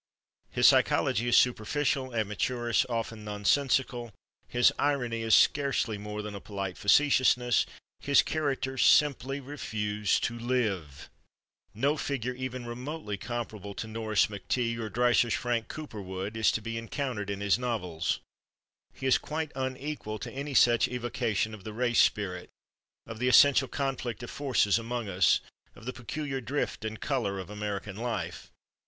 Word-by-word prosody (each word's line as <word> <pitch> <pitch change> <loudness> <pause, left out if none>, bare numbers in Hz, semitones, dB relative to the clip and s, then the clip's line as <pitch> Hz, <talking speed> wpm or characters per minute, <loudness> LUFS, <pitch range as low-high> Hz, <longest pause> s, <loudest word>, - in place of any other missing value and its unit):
His - - +1
psychology 115 +4 +3
is 120 - +5
superficial, 130 +2 +1
amateurish, 115 +1 0
often 115 -2 -3
nonsensical; 120 +3 0 0.4
his 120 0 +4
irony 125 -6 0
is 110 -1 +4
scarcely 135 -7 +2
more 105 +1 -5
than 105 0 -6
a 100 - -7
polite 100 -3 -5
facetiousness; 125 0 +3 0.3
his 140 -1 +4
characters 135 -4 -1
simply 140 -2 +3
refuse 105 -7 -1
to 120 0 -2
live. 105 - -2 0.7
No 140 +7 +1
figure 125 -4 -2
even 130 -1 -5
remotely 125 -1 -5
comparable 110 -3 -6
to 110 - -5
Norris' 110 -1 +1
McTeague 115 +3 -2
or 110 -1 -4
Dreiser's 120 +1 +3
Frank 120 -2 -1
Cowperwood 100 -8 -6
is 110 -1 +3
to 110 - -2
be 115 0 -3
encountered 115 -3 -4
in 100 -1 -3
his 100 +3 +2
novels. 90 -10 -2 0.7
He - - -7
is 130 - +4
quite 155 0 -4
unequal 130 -3 -4
to - - -7
any 140 +1 -5
such 120 -2 +5
evocation 120 -3 -1
of 105 -3 -10
the 110 - -7
race 120 +1 +3
spirit, 90 -4 0 0.6
of 115 -1 -8
the 125 - +1
essential 135 +1 +6
conflict 130 -4 -3
of 120 - -7
forces 125 -6 +2
among 115 -1 -4
us, 90 -1 +3 0.3
of - - -14
the 125 - -4
peculiar 135 +2 -4
drift 135 -1 -3
and 110 0 -4
color 115 -9 -1
of 95 +1 -7
American 105 -1 -4
life. 115 -2 -4
120 Hz, 145 wpm, -29 LUFS, 105-130 Hz, 0.7 s, essential